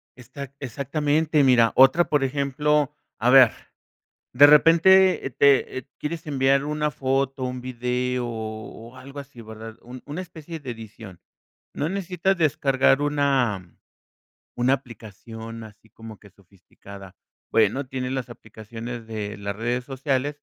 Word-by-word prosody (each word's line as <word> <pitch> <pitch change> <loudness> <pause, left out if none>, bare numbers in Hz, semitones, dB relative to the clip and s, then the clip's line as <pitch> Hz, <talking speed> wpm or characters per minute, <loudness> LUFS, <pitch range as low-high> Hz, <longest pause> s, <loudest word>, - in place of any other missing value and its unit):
Exac 140 +2 -10
exactamente. 145 +3 0
Mira 120 -3 +4
otra, 135 +7 +5
por 145 -2 +2
ejemplo, 145 +2 0 0.3
a 120 - +2
ver, 130 -3 +8 0.8
de 140 +4 +8
repente, 170 +4 +5
eh, - - -3
te, 140 0 +3
eh, 130 - -11
quieres 160 +1 -5
enviar 135 -1 +2
una 150 0 -1
foto, 135 0 -1
un 125 0 -4
video, 125 0 -2
o, 110 +2 -8
algo 135 +2 -11
así 135 -4 -10
¿verdad? 110 0 -10
Un 125 +1 -11
una 150 +5 -5
especie 165 -2 -10
de 130 -3 -7
edición. 110 -5 -11 0.5
No 150 - -2
necesitas 190 0 -1
descargar 140 -4 +2
una 135 -11 0 0.8
una 125 +2 +2
aplicación 115 -2 -8
así 110 +1 -16
como 110 -2 -12
que 100 - -17
sofisticada. 95 0 -15 0.4
Bueno, 115 +5 +2
tiene 130 0 -4
las 130 -2 -4
aplicaciones 115 +1 -9
de 105 -2 -5
las 100 -1 -5
redes 120 +3 -2
sociales. 140 +1 -2
130 Hz, 135 wpm, -24 LUFS, 115-145 Hz, 0.8 s, ver